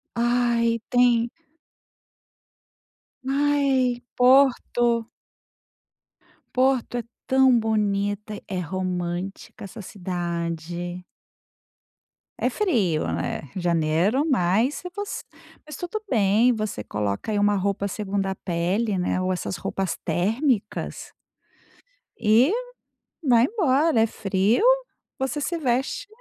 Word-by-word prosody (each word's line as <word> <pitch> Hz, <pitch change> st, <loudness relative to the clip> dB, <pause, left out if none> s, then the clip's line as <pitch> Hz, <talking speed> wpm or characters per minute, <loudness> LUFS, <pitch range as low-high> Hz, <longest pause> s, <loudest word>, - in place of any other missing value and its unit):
Ai, 235 Hz, -1 st, +2 dB
tem. 240 Hz, -1 st, +3 dB, 2.0 s
Ai, 275 Hz, -3 st, +2 dB
Porto. 245 Hz, -3 st, +3 dB, 1.5 s
Porto 255 Hz, -2 st, +2 dB
é 240 Hz, -, -2 dB, 0.2 s
tão 265 Hz, -1 st, +5 dB
bonita. 210 Hz, -1 st, -1 dB
É 185 Hz, -2 st, -3 dB
romântica 180 Hz, +2 st, -4 dB
essa 210 Hz, +3 st, -8 dB
cidade. 175 Hz, -1 st, -4 dB, 1.3 s
É -, -, +1 dB
frio, 215 Hz, -, +1 dB
né, 85 Hz, -, -3 dB
janeiro, 175 Hz, -, +1 dB
mas 225 Hz, +3 st, +2 dB
se 360 Hz, -, -6 dB
eu 360 Hz, -, -10 dB
fosse 410 Hz, +1 st, -5 dB, 0.4 s
mas 305 Hz, -2 st, -8 dB
tudo 355 Hz, +7 st, -4 dB
bem. 215 Hz, +2 st, +4 dB
Você 215 Hz, -, -3 dB
coloca 105 Hz, -, -3 dB
aí 210 Hz, -, 0 dB
uma 205 Hz, 0 st, +3 dB
roupa 200 Hz, +1 st, -1 dB
segunda 195 Hz, -1 st, -2 dB
pele, 190 Hz, +5 st, -1 dB
né, 180 Hz, +1 st, 0 dB
ou 185 Hz, 0 st, 0 dB
essas 185 Hz, 0 st, -3 dB
roupas 190 Hz, -1 st, -3 dB
térmicas 225 Hz, -, -1 dB, 1.1 s
e 225 Hz, -, +4 dB, 0.7 s
vai 240 Hz, -4 st, +5 dB
embora. 310 Hz, -, +2 dB
É 225 Hz, -, +4 dB
frio, 205 Hz, -, +1 dB, 0.6 s
você 280 Hz, +3 st, -2 dB
se 340 Hz, +3 st, -1 dB
veste 270 Hz, -, -1 dB
215 Hz, 100 wpm, -24 LUFS, 185-255 Hz, 2.0 s, tão